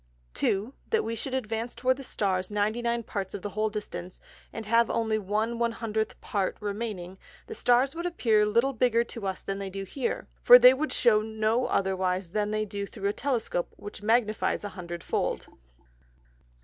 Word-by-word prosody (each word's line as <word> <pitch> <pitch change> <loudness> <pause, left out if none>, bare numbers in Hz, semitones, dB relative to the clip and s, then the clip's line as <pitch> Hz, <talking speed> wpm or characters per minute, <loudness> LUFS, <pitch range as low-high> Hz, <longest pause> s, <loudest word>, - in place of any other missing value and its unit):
2. 205 +7 0 0.2
That 450 - +2
could - - -7
we 230 +4 -2
advance 225 0 -3
towards 255 0 +1
the 275 - -8
Stars 190 -6 -1
99 230 +3 0
Parts 195 -3 -4
of 190 - -7
the 205 - -4
whole 215 +1 0
Distance, 205 -4 -6 0.3
and 225 - -6
have 230 +2 +3
only 220 -1 0
1/100 220 +1 -1
Part 195 -3 -2
remaining, 200 -3 -5 0.3
the - - -7
Stars 255 - +3
would 340 +1 -3
appear 225 -11 +2
little 235 +6 +2
bigger 235 -1 +3
to 230 -4 -6
us 190 -1 -4
than 195 0 -3
they 195 -1 -4
do 195 +1 -5
here; 245 +6 -3
for 245 - +10
they 250 +1 +8
would 305 +4 -2
shew 220 -3 +4
no 220 +2 0
otherwise 185 -2 0
than 210 +1 0
they 215 0 -1
do 200 -1 -5
through 200 -1 -3
a - - -1
Telescope, 235 -10 -1
which 205 -1 -9
magnifies 220 -1 +1
an 205 - -5
Hundred 175 -2 -7
fold. - - -1
215 Hz, 175 wpm, -28 LUFS, 200-235 Hz, 0.3 s, for